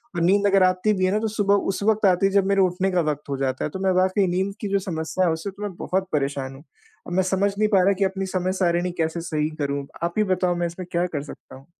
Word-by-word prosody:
और 170 - -1
नींद 200 +4 +3
अगर 195 -1 +4
आती 185 +3 +2
भी 185 -1 +1
है 185 - +1
ना 210 - +1
तो 220 - -1
सुबह 205 -2 +1 0.2
उस 195 - -5
वक़्त 220 0 +2
आती 185 0 +4
है, 195 - +2
जब 200 -1 +3
मेरे 195 0 +3
उठने 185 +1 +1
का 180 -1 +2
वक़्त 145 0 -8
हो 140 - -2
जाता 130 -1 -2
है, - - -2
तो 190 - -7
मैं 190 - +3
वाक़ई 190 +1 +2
नींद 190 +3 -1
की 210 - -2
जो 200 - +2
समस्या 180 -1 -2
है 170 - +2
उससे 160 +5 -4
तो 200 +2 -10
मैं 205 -2 -4
बहुत 190 +1 -1
परेशान 140 -2 -2
हूँ। 135 - -14 0.4
अब 175 - -5
मैं 190 +1 +2
समझ 190 +2 +1
नहीं 215 +1 +3
पा 195 -3 +4
रहा 195 +2 +4
कि - - +3
अपनी 190 0 -2
समय 185 -1 -1
सारिणी 175 0 +1
कैसे 160 +1 -1
सही 155 -2 -1
करूँ, 140 0 -2 0.2
आप 170 0 -1
ही 215 - +4
बताओ 185 -2 +1
मैं 175 0 -1
इसमें 175 +2 -7
क्या 175 +1 +1
कर 150 -5 -4
सकता 145 - -12
हूँ? 135 +1 -15
185 Hz, 290 wpm, -23 LUFS, 165-195 Hz, 0.4 s, अगर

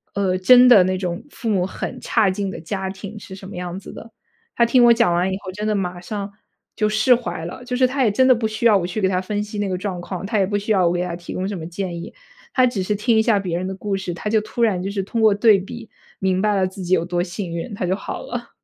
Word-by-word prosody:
呃， 190 -2 +1
真 250 +6 +7
的 225 -7 +8
那 185 0 0
种 180 -2 -4
父 235 -5 -5
母 190 -4 +1
很 250 +6 -6
差 220 -4 +2
劲 195 +1 -3
的 - - -7
家 190 +3 -4
庭 200 +2 -8
是 190 -1 -10
什 190 0 -11
么 205 - -9
样 180 0 -5
子 - - -11
的， 225 - -11 0.4
他 235 - +4
听 245 +1 +4
我 235 - +8
讲 230 -6 +2
完 180 +2 +1
以 - - -2
后 185 - -6
真 210 +3 -4
的 215 - +1
马 180 -2 -3
上 200 +2 -5 0.4
就 215 -1 +1
释 215 +4 +4
怀 175 -9 -5
了。 175 +8 -8
就 250 - -3
是 255 - +4
他 270 +1 0
也 230 - +4
真 260 +6 +3
的 255 - +7
不 225 -1 -1
需 215 +2 -4
要 225 -3 +6
我 175 -2 -2
去 180 +4 -4
给 190 - +3
他 185 -1 0
分 205 +2 -2
析 210 0 -6
那 205 -1 -1
个 185 - -1
状 185 -2 -4
况， 185 +1 -6
他 215 +1 0
也 195 - +3
不 205 +1 0
需 205 +2 -3
要 185 -4 +4
我 - - +2
给 175 0 -1
他 175 -1 -4
提 175 0 -8
供 185 +1 -2
什 205 - -4
么 165 - -7
建 175 -1 -5
议。 - - -8 0.4
他 255 - +4
只 235 -6 -2
是 210 +3 -1
听 225 +3 +1
一 - - +5
下 220 -2 +3
别 180 -3 -2
人 185 +1 -3
的 190 - -4
故 195 +1 -3
事， 190 -2 -4
他 210 - -4
就 220 -1 +3
突 215 +2 -3
然 200 -6 +2
就 195 - -2
是 200 -1 -2
通 225 +4 -2
过 220 -1 +6
对 205 0 +5
比 230 +4 -9 0.3
明 190 -1 +1
白 210 0 +2
了 190 -1 +2
自 190 +1 -9
己 180 +1 +3
有 165 - -1
多 175 0 -1
幸 180 0 -5
运， 170 +8 -5
他 195 - -2
就 185 +2 +1
好 - - -6
了。 240 0 -6
195 Hz, 325 characters per minute, -21 LUFS, 185-220 Hz, 0.4 s, 的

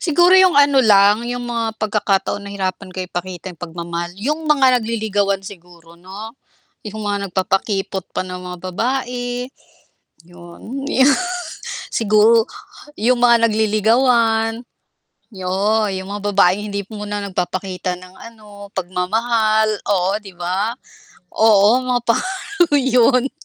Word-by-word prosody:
Siguro 350 +2 +3
yung 370 -5 +5
ano 285 -1 +5
lang, 210 0 +4
yung 245 0 -4
mga 230 -2 -3
pagkakataon 205 -2 -1
nahirapan 195 -1 -4
ka 185 - -3
ipakita 180 0 -6
yung 170 - -21
pagmamahal, 170 0 -5
yung 290 +10 -2
mga 265 -4 +4
nagliligawan 205 -3 -1
siguro 170 -3 -13
'no? 195 +5 -9 0.5
Yung 215 +1 -6
mga 200 -1 -2
nagpapakipot 195 +1 -2
pa - - -1
na 180 0 -7
mga 180 0 -8
babae, 245 +2 -3 0.8
'yon. 175 +10 -9
'Yo 265 -3 +3 0.9
Siguro 220 +1 +4 0.5
yung 240 +3 +2
mga 235 -1 +5
nagliligawan, 225 +1 +2 0.7
yo 200 +3 0
yung 190 -1 -5
mga 205 - -5
babaeng 200 +1 +2
hindi 200 -1 -4
muna 205 0 -4
nagpapakita 180 -1 -3
ng 185 0 -14
ano, 210 -3 -13
pagmamahal, 215 +4 +1 0.2
oo, 190 -1 +2
'di 195 -3 -13
ba? 195 +7 -2 0.6
Oo 220 +3 +4
mga 250 -1 0
pa 230 - +3 0.6
'yon. 255 -1 +3
210 Hz, 120 wpm, -19 LUFS, 190-235 Hz, 0.9 s, yung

